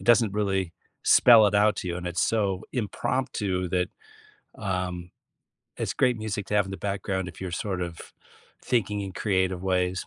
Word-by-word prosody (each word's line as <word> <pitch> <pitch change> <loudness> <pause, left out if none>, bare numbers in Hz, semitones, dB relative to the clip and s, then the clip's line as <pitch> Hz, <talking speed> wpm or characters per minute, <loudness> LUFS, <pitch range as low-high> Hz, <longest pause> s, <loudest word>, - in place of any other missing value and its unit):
It - - -11
doesn't 115 -3 +4
really 95 -4 -1 0.3
spell 115 -3 +7
it 100 - 0
out 105 +1 +4
to 90 - -4
you, 85 - -2
and 90 0 -6
it's 85 0 0
so 100 -4 0
impromptu 105 -5 -2
that, 90 0 0 0.7
um, 90 -3 -3 0.7
it's - - -2
great 125 -2 +2
music 105 -2 -4
to 105 - -3
have 105 - +4
in 95 - -8
the 95 - -5
background 95 -2 -2
if 85 - -12
you're 95 - -4
sort 95 +1 -3
of 85 -1 -5 0.6
thinking 105 -4 0
in 95 -1 -6
creative 95 -2 0
ways. 90 -1 0
95 Hz, 180 wpm, -26 LUFS, 90-105 Hz, 0.7 s, spell